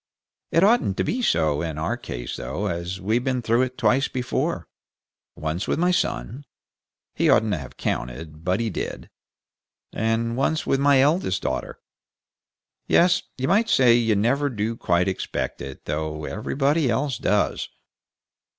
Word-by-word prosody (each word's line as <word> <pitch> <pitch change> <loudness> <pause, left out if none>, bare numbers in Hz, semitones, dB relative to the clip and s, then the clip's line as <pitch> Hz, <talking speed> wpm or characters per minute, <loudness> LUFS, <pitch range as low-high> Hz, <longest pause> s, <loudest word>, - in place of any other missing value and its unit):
It 165 - +4
oughtn't 200 - +3
be 250 - -1
so 80 - +2
in 80 -3 -4
our 80 - -1
case, - - -6
though, - - -4
as 85 +2 -3
we've 110 +5 0
been 125 -2 -1
through 115 +2 +2
it 130 0 -2
twice 125 +5 +2
before: 130 - -2 0.7
once 80 +5 -3
with - - 0
my 175 +3 +2
son 120 - -2 0.7
he - - +2
oughtn't 110 -1 +4
to 85 - -1
have 65 -3 -10
counted, 75 +6 -4
but 90 +2 +1
he 115 -2 -1
did - - -5 0.8
and 115 +1 0
once 145 +5 0
with 135 - +1
my 140 -1 +5
eldest 145 - +1
daughter. 65 -1 -3 1.1
Yes, 180 +1 +4 0.2
you 130 0 -1
might 215 +7 +3
say 125 -3 +5
you 115 -2 +3
never 135 +8 +1
do 115 -1 -2
quite 90 -4 +1
expect 95 - -3
it, 70 -1 -8
though 75 0 -3
everybody 140 +7 0
else 130 +3 0
does. 105 +1 0
115 Hz, 150 wpm, -24 LUFS, 85-135 Hz, 1.1 s, my